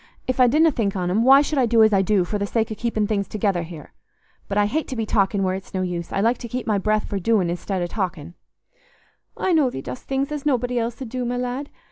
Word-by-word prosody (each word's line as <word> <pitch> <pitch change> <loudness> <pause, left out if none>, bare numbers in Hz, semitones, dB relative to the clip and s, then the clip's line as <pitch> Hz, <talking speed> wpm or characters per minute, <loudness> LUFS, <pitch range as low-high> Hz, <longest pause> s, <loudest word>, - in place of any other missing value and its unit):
If 255 0 -2
I 250 - +7
didna 310 +6 +4
think 210 -7 -1
on 180 -1 -1
'em, 210 +5 +2
why 270 +3 +7
should 295 -1 -1
I 250 - +3
do 225 -1 +5
as 220 -1 +4
I 195 - +4
do, 195 -1 +2
for 205 +3 -3
the 200 - -1
sake 225 +1 -1
o' - - -3
keeping 220 -2 -1
things 200 -2 -1
together 200 -4 0
here? 165 -3 -10 0.5
But 200 - -2
I 205 - +4
hate 305 +10 -1
to 260 - -5
be 225 -2 -2
talking 200 -2 +1
where 185 0 +1
it's 190 +1 -7
no 185 - 0
use: 175 -2 -4
I 195 - 0
like 230 +4 +2
to 235 - -6
keep 245 +2 -4
my 210 -3 +1
breath 215 +2 0
for 200 - -3
doing 190 -3 +1
i'stead 180 +1 -3
o' - - 0
talking." 175 -4 -4 1.0
"I 375 - +1
know 300 -5 +4
thee 135 - -6
dost 125 - -7
things 275 +1 -1
as 295 -2 -4
nobody 250 -3 0
else 235 0 -3
'ud 240 - -8
do, 250 +1 -3
my 245 +1 -2
lad. 250 +3 -3
220 Hz, 270 wpm, -22 LUFS, 195-250 Hz, 1.0 s, I